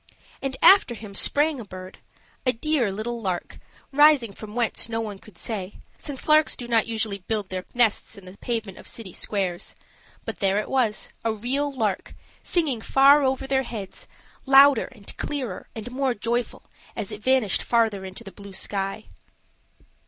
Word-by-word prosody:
And 270 Hz, -1 st, -3 dB
after 380 Hz, -11 st, +7 dB
him 210 Hz, -2 st, -10 dB
sprang 290 Hz, +7 st, +5 dB
a -, -, -6 dB
bird 185 Hz, -2 st, -10 dB, 0.4 s
a 255 Hz, -, +2 dB
dear 255 Hz, -3 st, 0 dB
little 230 Hz, +4 st, -4 dB
lark, 185 Hz, -4 st, -4 dB, 0.3 s
rising 290 Hz, -7 st, +5 dB
from 210 Hz, +2 st, -10 dB
whence 235 Hz, -1 st, 0 dB
no 225 Hz, 0 st, -2 dB
one 210 Hz, -3 st, -5 dB
could 210 Hz, -4 st, -16 dB
say, 200 Hz, -3 st, -4 dB, 0.3 s
since 280 Hz, -3 st, -6 dB
larks 310 Hz, 0 st, +5 dB
do 240 Hz, -, -7 dB
not 230 Hz, -2 st, +2 dB
usually 220 Hz, -3 st, -2 dB
build 205 Hz, +1 st, -3 dB
their 185 Hz, -1 st, -4 dB
nests 235 Hz, -4 st, +1 dB
in 195 Hz, -, -13 dB
the 185 Hz, +1 st, -11 dB
pavement 225 Hz, -5 st, -4 dB
of -, -, -9 dB
city 205 Hz, -6 st, -5 dB
squares. 190 Hz, -4 st, -3 dB, 0.5 s
But -, -, -5 dB
there 195 Hz, 0 st, +2 dB
it 210 Hz, -, -2 dB
was, 240 Hz, -5 st, 0 dB
a 225 Hz, -, +1 dB
real 260 Hz, +7 st, -1 dB
lark, 220 Hz, -8 st, -2 dB, 0.3 s
singing 295 Hz, -10 st, +1 dB
far 275 Hz, +5 st, +6 dB
over 265 Hz, -1 st, 0 dB
their 270 Hz, 0 st, +1 dB
heads, 220 Hz, -7 st, -7 dB, 0.4 s
louder 275 Hz, -2 st, +7 dB
and 200 Hz, -2 st, -7 dB
clearer 255 Hz, -10 st, -4 dB
and 225 Hz, +2 st, -7 dB
more 260 Hz, -1 st, 0 dB
joyful 235 Hz, +2 st, -2 dB, 0.3 s
as 205 Hz, -, -4 dB
it 210 Hz, 0 st, -7 dB
vanished 255 Hz, -4 st, +2 dB
further 225 Hz, -4 st, +1 dB
into 190 Hz, 0 st, -8 dB
the 195 Hz, -, -10 dB
blue 200 Hz, +2 st, -12 dB
sky. 195 Hz, +2 st, -3 dB
225 Hz, 170 wpm, -24 LUFS, 200-265 Hz, 0.5 s, after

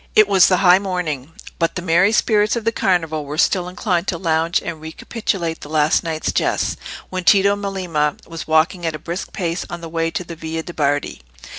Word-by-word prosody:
It 215 Hz, -1 st, +7 dB
was 195 Hz, -3 st, +6 dB
the 185 Hz, -, +3 dB
high 180 Hz, +1 st, +7 dB
morning, 170 Hz, -8 st, -3 dB, 0.3 s
but 165 Hz, -1 st, 0 dB
the 180 Hz, -, -3 dB
merry 180 Hz, +4 st, +4 dB
spirits 215 Hz, -1 st, +2 dB
of 230 Hz, -2 st, -4 dB
the 230 Hz, -, +3 dB
Carnival 165 Hz, -7 st, 0 dB
were 145 Hz, +1 st, -6 dB
still 180 Hz, +1 st, +2 dB
inclined 180 Hz, -1 st, -1 dB
to 170 Hz, -, -1 dB
lounge 165 Hz, 0 st, +1 dB
and 165 Hz, -2 st, -6 dB
recapitulate 170 Hz, +1 st, -3 dB
the 145 Hz, -, -9 dB
last 155 Hz, 0 st, +2 dB
night's 160 Hz, -1 st, -2 dB
jests, -, -, 0 dB, 0.4 s
when 185 Hz, -1 st, -3 dB
Tito 200 Hz, +3 st, +5 dB
Melema 180 Hz, -7 st, -2 dB
was 165 Hz, -1 st, -7 dB
walking 160 Hz, +3 st, +2 dB
at 165 Hz, -2 st, -1 dB
a -, -, -4 dB
brisk 170 Hz, +5 st, -6 dB
pace 170 Hz, -2 st, -2 dB
on 175 Hz, -, -6 dB
the 165 Hz, -, -6 dB
way 165 Hz, 0 st, -1 dB
to 180 Hz, -, -4 dB
the 170 Hz, -1 st, -8 dB
Via 160 Hz, 0 st, -5 dB
de' 175 Hz, -, -8 dB
Bardi. 145 Hz, -, -1 dB
170 Hz, 205 wpm, -20 LUFS, 160-185 Hz, 0.4 s, It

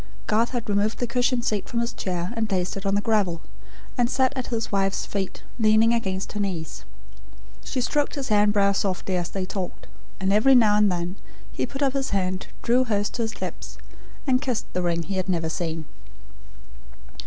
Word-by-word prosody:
Garth 225 Hz, +2 st, +2 dB
had 240 Hz, -3 st, -3 dB
removed 205 Hz, +1 st, +1 dB
the 245 Hz, -, 0 dB
cushion 245 Hz, 0 st, +1 dB
seat 210 Hz, -4 st, -1 dB
from 235 Hz, -, -1 dB
his 235 Hz, 0 st, -1 dB
chair, 180 Hz, +2 st, -3 dB
and 225 Hz, -1 st, -1 dB
placed 185 Hz, -2 st, 0 dB
it 195 Hz, 0 st, -4 dB
on 195 Hz, -, +2 dB
the 205 Hz, -, +2 dB
gravel; 205 Hz, -7 st, +1 dB, 0.6 s
and 240 Hz, -1 st, +3 dB
sat 260 Hz, +1 st, +2 dB
at 260 Hz, -2 st, -3 dB
his 230 Hz, -2 st, -2 dB
wife's 195 Hz, -1 st, +1 dB
feet 195 Hz, -2 st, -4 dB, 0.2 s
leaning 220 Hz, +1 st, +5 dB
against 190 Hz, -5 st, -1 dB
her 210 Hz, -, -4 dB
knees. 180 Hz, -6 st, -3 dB, 0.8 s
She 255 Hz, -, -2 dB
stroked 290 Hz, +3 st, 0 dB
his 275 Hz, -3 st, -3 dB
hair 210 Hz, -1 st, +5 dB
and 210 Hz, 0 st, +4 dB
brow 200 Hz, -1 st, +4 dB
softly, 190 Hz, -1 st, -1 dB
as 175 Hz, -1 st, -1 dB
they 190 Hz, -1 st, -3 dB
talked; 185 Hz, -1 st, -5 dB, 0.3 s
and 190 Hz, 0 st, +1 dB
every 260 Hz, +6 st, +6 dB
now 215 Hz, -4 st, +6 dB
and 210 Hz, -2 st, +4 dB
then 175 Hz, +2 st, -2 dB, 0.3 s
he -, -, -2 dB
put 275 Hz, +1 st, -3 dB
up 270 Hz, -2 st, +2 dB
his 275 Hz, -1 st, -1 dB
hand, 185 Hz, -1 st, -1 dB, 0.2 s
drew 245 Hz, +2 st, +4 dB
hers 205 Hz, -3 st, 0 dB
to 240 Hz, -, -3 dB
his 225 Hz, -1 st, -3 dB
lips, -, -, -6 dB, 0.5 s
and 255 Hz, -2 st, +3 dB
kissed 255 Hz, -6 st, -1 dB
the 180 Hz, -, 0 dB
ring 170 Hz, -1 st, 0 dB
he 190 Hz, +3 st, -3 dB
had 185 Hz, 0 st, -2 dB
never 165 Hz, -3 st, 0 dB
seen. 160 Hz, -1 st, -3 dB
205 Hz, 200 wpm, -25 LUFS, 185-235 Hz, 0.8 s, every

